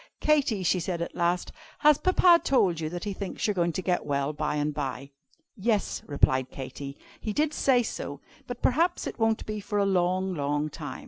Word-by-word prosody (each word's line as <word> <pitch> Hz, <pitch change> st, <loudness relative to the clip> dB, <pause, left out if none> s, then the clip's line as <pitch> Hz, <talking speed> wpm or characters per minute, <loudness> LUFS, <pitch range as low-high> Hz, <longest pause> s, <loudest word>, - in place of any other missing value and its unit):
"Katy," 275 Hz, -10 st, +2 dB
she 180 Hz, +1 st, +2 dB
said 175 Hz, 0 st, -3 dB
at -, -, -7 dB
last, 175 Hz, +1 st, 0 dB, 0.3 s
"has 300 Hz, -1 st, +5 dB
Papa 360 Hz, -2 st, +5 dB
told 190 Hz, -11 st, +2 dB
you 155 Hz, -1 st, -2 dB
that 175 Hz, +1 st, -6 dB
he 205 Hz, -, -3 dB
thinks 195 Hz, 0 st, -4 dB
you 210 Hz, -, +2 dB
are -, -, -2 dB
going 175 Hz, -2 st, +1 dB
to 185 Hz, -, -3 dB
get 180 Hz, -1 st, 0 dB
well 140 Hz, +1 st, -1 dB
by 150 Hz, 0 st, -2 dB
and 150 Hz, 0 st, -1 dB
by?" 135 Hz, 0 st, -4 dB, 0.4 s
"Yes," 215 Hz, -1 st, 0 dB
replied 130 Hz, -3 st, +2 dB
Katy, 140 Hz, +1 st, -7 dB, 0.2 s
"he 215 Hz, -, -3 dB
did 305 Hz, +3 st, +1 dB
say 255 Hz, -4 st, +3 dB
so. -, -, -5 dB, 0.3 s
But 245 Hz, -1 st, -7 dB
perhaps 335 Hz, +7 st, +2 dB
it -, -, -6 dB
won't 225 Hz, -1 st, +1 dB
be 215 Hz, 0 st, -4 dB
for 205 Hz, +1 st, -3 dB
a 200 Hz, -, +3 dB
long, 185 Hz, 0 st, +1 dB
long 145 Hz, -1 st, -1 dB
time. 145 Hz, -3 st, -7 dB
185 Hz, 205 wpm, -27 LUFS, 150-225 Hz, 0.4 s, has